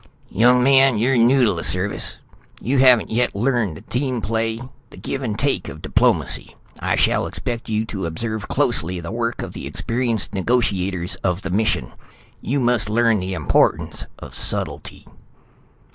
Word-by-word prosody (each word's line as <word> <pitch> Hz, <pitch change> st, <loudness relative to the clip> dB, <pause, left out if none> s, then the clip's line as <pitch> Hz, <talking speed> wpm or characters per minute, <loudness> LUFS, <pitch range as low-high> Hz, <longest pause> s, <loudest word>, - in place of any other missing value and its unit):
"Young 125 Hz, +3 st, +4 dB
man, 135 Hz, -2 st, +5 dB
you're 125 Hz, +5 st, +2 dB
new 125 Hz, +3 st, +4 dB
to 105 Hz, -, +2 dB
the 85 Hz, -, -5 dB
Service. 90 Hz, +5 st, -1 dB, 0.4 s
You 130 Hz, +3 st, 0 dB
haven't 125 Hz, -4 st, +5 dB
yet 120 Hz, 0 st, +1 dB
learned 110 Hz, -, 0 dB
the -, -, -12 dB
team 130 Hz, -1 st, -2 dB
play, 115 Hz, +1 st, -1 dB, 0.3 s
the -, -, -14 dB
give 140 Hz, -, -4 dB
and 110 Hz, -5 st, -3 dB
take 140 Hz, +4 st, 0 dB
of 80 Hz, -, -9 dB
diplomacy. -, -, 0 dB, 0.2 s
I -, -, 0 dB
shall -, -, +2 dB
expect 120 Hz, -1 st, -5 dB
you 110 Hz, 0 st, 0 dB
to 95 Hz, -5 st, -4 dB
observe 110 Hz, +6 st, -4 dB
closely 85 Hz, +4 st, 0 dB
the 85 Hz, -1 st, -6 dB
work 115 Hz, 0 st, -2 dB
of -, -, -7 dB
the -, -, -6 dB
experienced 115 Hz, -3 st, -1 dB
negotiators 95 Hz, -4 st, 0 dB
of 90 Hz, +1 st, -2 dB
the -, -, -4 dB
mission. 100 Hz, -, 0 dB, 0.5 s
You 140 Hz, +4 st, -1 dB
must 120 Hz, -4 st, +1 dB
learn 115 Hz, -1 st, +3 dB
the 95 Hz, +1 st, -3 dB
importance 80 Hz, -4 st, +1 dB
of -, -, -11 dB
subtlety." -, -, -4 dB
115 Hz, 160 wpm, -21 LUFS, 95-125 Hz, 0.5 s, man